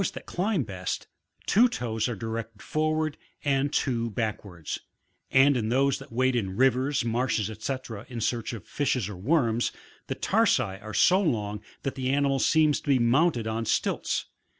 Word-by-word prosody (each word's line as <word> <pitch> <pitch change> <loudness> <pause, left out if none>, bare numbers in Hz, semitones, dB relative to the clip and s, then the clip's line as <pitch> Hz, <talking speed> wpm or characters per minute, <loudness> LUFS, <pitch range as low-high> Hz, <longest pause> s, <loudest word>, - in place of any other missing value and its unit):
15 - - -3
climb 185 -3 0
best, 95 -4 -4 0.4
two 240 +5 +5
toes 115 - -2
are 120 - -2
directed 115 0 -5
forward 155 +3 0 0.3
and 140 0 +2
two 115 -6 0
backwards; 105 -7 -4 0.5
and 135 +1 +5
in 110 -3 -1
those 135 +2 +2
that - - -12
wade 130 +2 +2
in 95 -5 -1
rivers, 130 +1 +2
marshes, 115 -2 0
&c., 135 - 0 0.3
in 120 -2 -5
search 115 0 -1
of 115 -5 -8
fishes 130 -7 0
or 105 - -6
worms, 120 - +1 0.4
the - - -2
tarsi - - +3 0.2
are 110 0 -7
so 185 +2 +5
long 105 - -1 0.2
that 135 - -2
the 130 -1 -2
animal 140 0 +2
seems 155 -1 +3
to - - -17
be 135 - +5
mounted 125 +1 +3
on 110 +1 -2
stilts. - - 0
125 Hz, 165 wpm, -27 LUFS, 110-140 Hz, 0.5 s, two